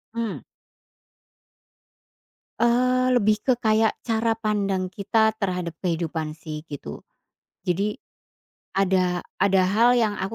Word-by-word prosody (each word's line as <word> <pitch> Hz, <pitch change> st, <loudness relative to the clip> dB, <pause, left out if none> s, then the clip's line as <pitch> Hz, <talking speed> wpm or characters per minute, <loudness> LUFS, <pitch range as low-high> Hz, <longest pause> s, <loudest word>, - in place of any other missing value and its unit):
Mmm. 230 Hz, -3 st, -3 dB, 2.2 s
Eee, 255 Hz, +2 st, +3 dB
lebih 215 Hz, -1 st, +2 dB
ke 255 Hz, -, +3 dB
kayak 220 Hz, -1 st, +2 dB
cara 225 Hz, 0 st, +1 dB
pandang 200 Hz, -4 st, 0 dB
kita 210 Hz, +4 st, +1 dB
terhadap 180 Hz, -4 st, -2 dB
kehidupan 160 Hz, -3 st, -2 dB
sih, 155 Hz, -1 st, -7 dB
gitu. 130 Hz, -, -7 dB, 0.6 s
Jadi, 200 Hz, +4 st, 0 dB, 0.8 s
ada 185 Hz, -2 st, +1 dB, 0.2 s
ada 195 Hz, -1 st, +4 dB
hal 220 Hz, +6 st, +4 dB
yang 220 Hz, -3 st, +2 dB
kan -, -, -6 dB
200 Hz, 105 wpm, -24 LUFS, 180-225 Hz, 2.2 s, ada